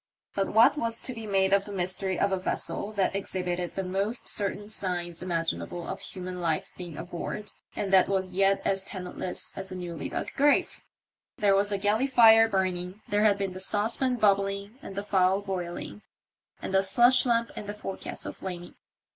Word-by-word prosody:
But 195 -1 0
what 230 +7 +5
was 230 -2 0
to 255 - -5
be 225 -2 -7
made 195 -1 +2
of 200 0 +3
the 205 - -7
mystery 185 0 -1
of 200 - +2
a 190 - 0
vessel 200 +2 -2
that 195 -1 +1
exhibited 180 -2 -3
the 195 - -2
most 195 +6 -2
certain 205 0 -1
signs 175 -5 -3
imaginable 170 -1 -2
of - - -5
human 180 -1 -6
life 165 -2 -1
being 175 -5 -8
aboard, 175 +4 -5 0.2
and 195 -1 -2
that 190 - +6
was 190 -2 -1
yet 195 +1 +2
as 195 -1 +1
tenantless 180 -2 -5
as 190 0 -6
a - - -5
newly 175 -4 -5
dug - - -4
grave? 290 +1 +2 0.5
There 200 -1 +3
was 200 +1 +3
the 200 - 0
galley 210 +6 +2
fire 225 -3 +7
burning, 185 -1 -1
there 205 +1 +2
had 205 -2 +4
been 195 -2 -2
the 185 - -7
saucepan 220 +6 0
bubbling 200 +1 +1
and 195 - -9
the 200 - -3
fowl 190 0 +2
boiling, 175 - -5 0.6
and - - -4
the 190 - +5
slush 240 +6 +5
lamp 235 -2 +1
in 205 - -7
the 205 - -4
forecastle 195 -2 -6
flaming. 175 -2 -7
195 Hz, 185 wpm, -28 LUFS, 185-210 Hz, 0.6 s, fire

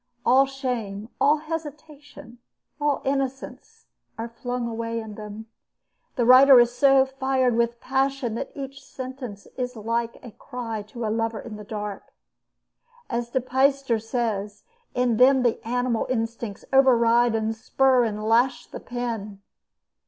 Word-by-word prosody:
All 265 +2 +5
shame, 235 -6 -4
all 295 +2 +5
hesitation, 300 -5 -8 0.4
all 290 -2 0
innocence, 270 -1 -4 0.3
are 225 +1 -4
flung 245 +1 -4
away 230 0 -3
in 220 -1 -7
them. 210 +1 -8 0.7
The 240 - +1
writer 260 +1 +8
is 240 0 +4
so 270 0 +5
fired 265 -2 0
with 235 0 0
passion 265 -2 -1
that 260 +4 -4
each 275 -1 -7
sentence 255 -6 -8
is 250 -1 -3
like 230 +1 -2
a 240 - -9
cry 230 -1 -6
to 230 +2 -6
a 215 - 0
lover 225 0 -1
in 225 -3 -8
the 210 - -9
dark. 210 -1 -7 1.0
As 235 0 -2
De 260 - 0
Peyster 265 -1 +1
says: 215 -3 -3 0.3
"In 250 -2 +1
them 260 +1 +5
the 240 -2 0
animal 245 -1 0
instincts 225 -3 -3
override 240 -3 +4
and 220 0 -1
spur 260 +2 +2
and 215 -2 -3
lash 240 +4 +2
the - - -9
pen." 225 -5 -5
240 Hz, 140 wpm, -24 LUFS, 225-265 Hz, 1.0 s, writer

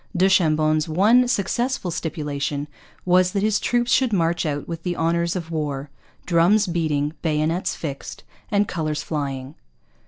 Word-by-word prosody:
Du 185 +2 +4
Chambon's 155 -3 +2
one 220 +10 +4
successful 240 -1 -1
stipulation 150 -3 -3 0.4
was 180 0 +3
that 200 -1 0
his 210 -1 +2
troops 240 0 0
should 260 -3 +3
march 170 -4 +1
out 145 -1 -3
with 165 -1 -5
the 175 0 -3
honours 170 +1 0
of 170 -2 -5
war, 145 -3 -3 0.3
drums 180 +5 +4
beating, 155 -4 -1
bayonets 160 +2 0
fixed, 140 -4 -7 0.3
and 205 -2 +2
colours 155 -3 -2
flying. 140 -3 -4
165 Hz, 145 wpm, -22 LUFS, 150-190 Hz, 0.4 s, Du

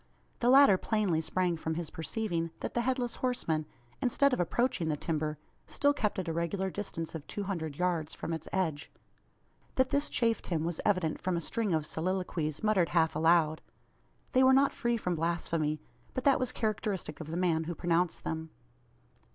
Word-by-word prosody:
The 240 - +3
latter 265 -8 +7
plainly 205 -8 +1
sprang 175 +1 0
from 160 0 -3
his 165 -2 -4
perceiving, 165 0 -2
that - - -3
the 240 - +1
Headless 250 -1 -1
Horseman, 165 -12 -1 0.3
instead 275 +2 +3
of - - 0
approaching 180 -1 +1
the 150 - 0
timber, 155 -1 -2 0.3
still 285 0 +2
kept 215 -7 -1
at 185 -2 -2
a 165 - -1
regular 185 +3 -1
distance 175 -5 -5
of 160 -3 -7
two 205 - -4
hundred 165 -7 -3
yards 170 -2 -1
from 165 - -4
its 160 -1 -5
edge. 165 -6 -1 0.8
That 260 0 +2
this 285 +1 +1
chafed 230 -2 0
him 165 -3 0
was 170 -1 -2
evident 185 -6 +1
from 185 -2 0
a - - +1
string 220 +3 -1
of 155 -2 +1
soliloquies, 165 -2 -2
muttered 200 -6 +3
half 165 -3 +2
aloud. 160 0 +3 0.7
They 260 0 +4
were 260 0 +7
not 275 +1 +4
free 235 -2 0
from 180 -5 -1
blasphemy; 165 -2 -1 0.4
but 255 - -2
that 275 -2 +4
was 255 -1 -1
characteristic 210 -8 -2
of 160 - -7
the 165 +2 -3
man 165 -3 +1
who 170 +1 -4
pronounced 175 0 0
them. 160 0 -4
175 Hz, 185 wpm, -31 LUFS, 160-220 Hz, 0.8 s, latter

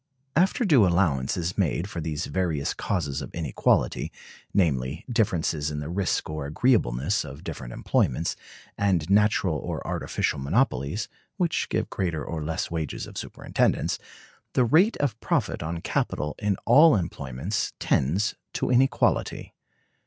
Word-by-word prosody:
After 190 - +3
due 135 - +6
allowance 85 -7 +1
is 90 +3 -2
made 90 0 +1
for 90 -4 -5
these 80 +1 -3
various 85 -7 -1
causes 75 -7 -2
of 65 - -6
inequality, 80 -6 +1 0.4
namely, 75 -5 0
difference 100 -10 +1
in 75 -1 -3
the 75 +1 -5
risk 95 0 0
or 75 -2 -4
agreeableness 75 - +2
of - - -9
different - - -6
employments, 75 +6 0 0.4
and 95 -6 +2
natural 100 -5 +3
or - - -5
artificial - - -1
monopolies 80 - 0 0.3
[which 175 -4 0
give - - 0
greater 85 -5 -2
or 80 -2 -4
less 80 +2 -2
wages 80 -4 -3
of - - -12
superintendence], - - 0 0.5
the 125 - +4
rate 170 - +4
of 125 -6 -1
profit - - 0
on 85 +2 -4
capital 75 -3 -1
in 105 -3 0
all 145 +5 +7
employments 85 - -2
tends 85 +11 +1 0.2
to - - -1
an 125 0 +6
equality. 135 - 0
85 Hz, 140 wpm, -26 LUFS, 75-105 Hz, 0.5 s, all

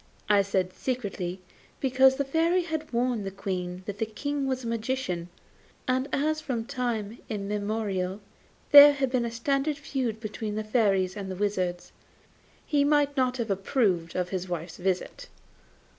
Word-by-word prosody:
I 205 -1 +6
said 190 -2 -1
secretly, 195 -8 -3 0.4
because 265 0 +4
the 280 +1 -1
Fairy 330 +6 +2
had 315 -2 -4
warned 240 -2 0
the 195 - -3
Queen 185 -2 -4
that 205 0 -6
the 225 - 0
King 285 +5 -3
was 260 -1 -2
a - - -4
magician; 230 -6 -2 0.6
and 260 +1 +1
as 310 +2 0
from 245 -7 -3
time 230 -3 -3
immemorial 205 -2 -2 0.5
there 290 0 +11
had 270 -3 -1
been 250 -2 +1
a 235 - -3
standing 275 +5 0
feud 260 -6 -3
between 215 -1 -4
the 215 - -2
Fairies 200 -5 +2
and 200 -2 -5
the 185 - -4
Wizards, 185 -3 -2 0.7
he 290 -2 +2
might 290 -1 +3
not 255 -2 +1
have 230 -4 -2
approved 195 -4 0
of 180 -1 -1
his 185 -1 -3
wife's 170 -1 -5
visit. 185 0 -2
225 Hz, 160 wpm, -27 LUFS, 195-265 Hz, 0.7 s, there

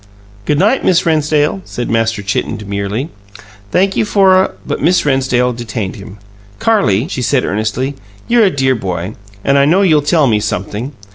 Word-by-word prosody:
"Good 150 - +1
night, 210 - +2
Miss 185 +1 +2
Rennsdale," 155 +2 +1
said 120 - -5
Master 115 -2 0
Chitten 100 - -2
demurely. 100 +6 -4 0.6
"Thank 195 +2 +2
you - - +2
for 195 -3 +4
a 190 +1 +2
" - - -28
But - - -3
Miss 170 +4 +2
Rennsdale 130 -3 +1
detained 115 -4 -5
him. 100 0 -11 0.4
"Carrie," 140 - +2
she 135 - -4
said 130 +1 +1
earnestly, 110 +6 -2 0.3
"you're 235 -2 +4
a - - +4
dear 135 -5 +1
boy, 95 -3 -4 0.3
and 140 0 +3
I 140 - +4
know 180 +7 +3
you'll 155 -6 +4
tell 150 +1 +2
me 110 -5 +2
something. 105 +5 -4
135 Hz, 180 wpm, -14 LUFS, 110-165 Hz, 0.6 s, for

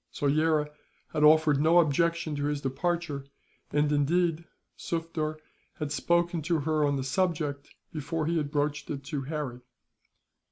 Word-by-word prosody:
Soyera 150 +1 +1 0.4
had 150 - +1
offered 150 -2 +5
no 165 +3 +5
objection 170 0 +2
to 145 0 -2
his 145 0 -1
departure 145 +2 -2 0.5
and, 145 0 +1
indeed, 165 +3 +1 0.3
Sufder 165 -2 -3 0.4
had 150 -2 -4
spoken 170 +2 +1
to 165 0 0
her 155 +1 +1
on 145 -1 +2
the 135 - -2
subject, 145 -1 -1 0.2
before 155 +1 -2
he 165 +2 0
had 150 -3 -1
broached 145 0 -1
it 140 -2 -4
to 140 +1 -3
Harry. 140 -5 -4
155 Hz, 145 wpm, -28 LUFS, 145-165 Hz, 0.5 s, offered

